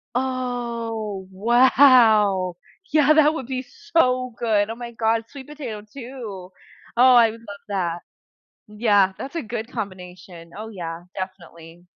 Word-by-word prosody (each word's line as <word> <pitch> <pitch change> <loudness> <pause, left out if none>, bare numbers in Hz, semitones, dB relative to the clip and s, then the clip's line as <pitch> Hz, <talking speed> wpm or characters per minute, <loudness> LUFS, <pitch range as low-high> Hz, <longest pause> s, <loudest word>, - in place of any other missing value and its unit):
Oh, 235 -6 -3
wow. 220 -4 +4 0.4
Yeah, 305 0 +5
that 305 0 +5
would 290 -6 -5
be 255 -1 -3
so 255 - 0
good. 215 -3 +1
Oh, 225 - -4
my 240 0 -8
god. 225 0 0
Sweet 270 -2 -11
potato, 260 -8 -7
too. 215 -5 -9 0.5
Oh, 250 +1 +7
I 230 -2 +6
would 230 - -12
love 205 -3 -10
that. 175 -4 -2 0.7
Yeah, 210 -3 +2
that's 275 - -8
a 335 - -1
good 230 0 -6
combination. 180 -5 -8
Oh, 220 +1 -6
yeah, 170 -4 -7
definitely. 175 -2 -9
225 Hz, 135 wpm, -22 LUFS, 195-255 Hz, 0.7 s, Oh